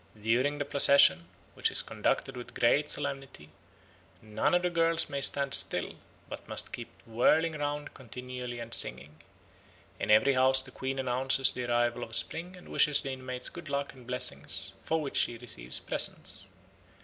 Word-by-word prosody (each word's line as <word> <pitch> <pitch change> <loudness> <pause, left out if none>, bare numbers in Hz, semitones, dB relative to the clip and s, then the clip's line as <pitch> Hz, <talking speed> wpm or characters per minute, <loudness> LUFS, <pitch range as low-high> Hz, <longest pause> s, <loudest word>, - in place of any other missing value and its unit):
During 125 +7 0
the 145 - -3
procession, 140 - +5 0.3
which - - 0
is - - +1
conducted - - -2
with 120 -1 -10
great 140 +5 +2
solemnity, 135 - -4 0.7
none 110 +9 -1
of 175 - +1
the 180 - 0
girls 165 -1 +1
may 140 0 -3
stand 140 0 +3
still, - - +3 0.3
but - - -9
must - - -3
keep - - -6 0.2
whirling 150 +8 +2
round 145 -1 -4
continually 125 0 -8
and 115 0 -7
singing. 75 +4 -2 0.8
In - - -4
every 110 +6 +5
house 130 0 +3
the 130 - -13
Queen 135 +1 -4
announces 130 +1 +2
the 125 - -5
arrival 120 0 0
of 115 - -5
spring 170 +9 -2
and 180 - -15
wishes 150 -2 +4
the 135 - -5
inmates 130 -1 -5
good 170 -3 -10
luck 140 0 -3
and 125 -3 -16
blessings, 125 0 0
for 160 - -1
which 145 -3 -4
she 120 - 0
receives 65 - -4
presents. - - -2
130 Hz, 165 wpm, -29 LUFS, 120-145 Hz, 0.8 s, procession